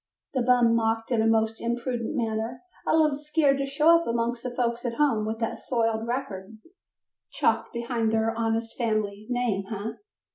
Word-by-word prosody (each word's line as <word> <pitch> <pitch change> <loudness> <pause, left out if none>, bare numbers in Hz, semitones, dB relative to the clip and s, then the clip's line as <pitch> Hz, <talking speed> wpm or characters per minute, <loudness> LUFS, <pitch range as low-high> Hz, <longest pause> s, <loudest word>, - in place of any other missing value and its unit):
the 260 - +1
bum 240 -1 +4
mocked 225 +1 0
in 230 -2 +3
a 225 - +2
most 225 0 +1
impudent 235 +2 -2
manner, 225 0 -2 0.2
"a - - +4
little 305 -3 +3
scared 295 -2 +2
to 275 - -1
show 310 +5 +5
up - - -7
amongst 235 0 -1
the 250 - -3
folks 240 -1 -1
at 240 -2 -2
home 235 -8 +2
with 220 +1 -2
that 225 -1 -3
soiled 225 -2 -1
record 220 -5 -4 0.7
chalked - - 0
behind 235 -1 -1
their 225 0 +1
honest 225 0 -1
family 215 -3 -1
name, 245 -6 0
eh?" 215 +1 -3
235 Hz, 175 wpm, -26 LUFS, 225-250 Hz, 0.7 s, show